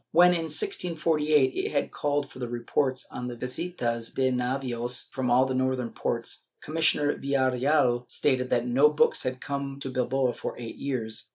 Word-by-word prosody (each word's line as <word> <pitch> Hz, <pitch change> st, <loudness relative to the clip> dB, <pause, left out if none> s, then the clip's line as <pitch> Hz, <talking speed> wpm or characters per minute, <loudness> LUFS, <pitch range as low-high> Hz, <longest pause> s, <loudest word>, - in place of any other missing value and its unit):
When, 180 Hz, +1 st, +6 dB
in 170 Hz, -2 st, 0 dB
1648, 155 Hz, -, +1 dB
it -, -, -2 dB
had 145 Hz, -, 0 dB
called 145 Hz, -1 st, -1 dB
for -, -, -12 dB
reports 125 Hz, +2 st, -1 dB
on 125 Hz, -, -5 dB
the 120 Hz, -, -5 dB
visitas 125 Hz, -3 st, -3 dB
de 130 Hz, -1 st, +1 dB
navios 125 Hz, -1 st, -2 dB
from 130 Hz, -2 st, -2 dB
all 125 Hz, +2 st, +5 dB
the 130 Hz, -, -2 dB
northern 130 Hz, -2 st, 0 dB
ports, -, -, -3 dB, 0.2 s
Commissioner 155 Hz, -2 st, +2 dB
Villareal 130 Hz, -2 st, +1 dB
stated 130 Hz, -3 st, +1 dB
that 120 Hz, 0 st, +1 dB
no 130 Hz, +5 st, +5 dB
books 150 Hz, -, +2 dB
had 130 Hz, 0 st, -3 dB
come 140 Hz, 0 st, -4 dB
to 135 Hz, -1 st, -5 dB
Bilbao 130 Hz, 0 st, +1 dB
for -, -, -6 dB
eight 115 Hz, -2 st, -7 dB
years. 115 Hz, -6 st, -4 dB
130 Hz, 165 wpm, -27 LUFS, 125-145 Hz, 0.2 s, When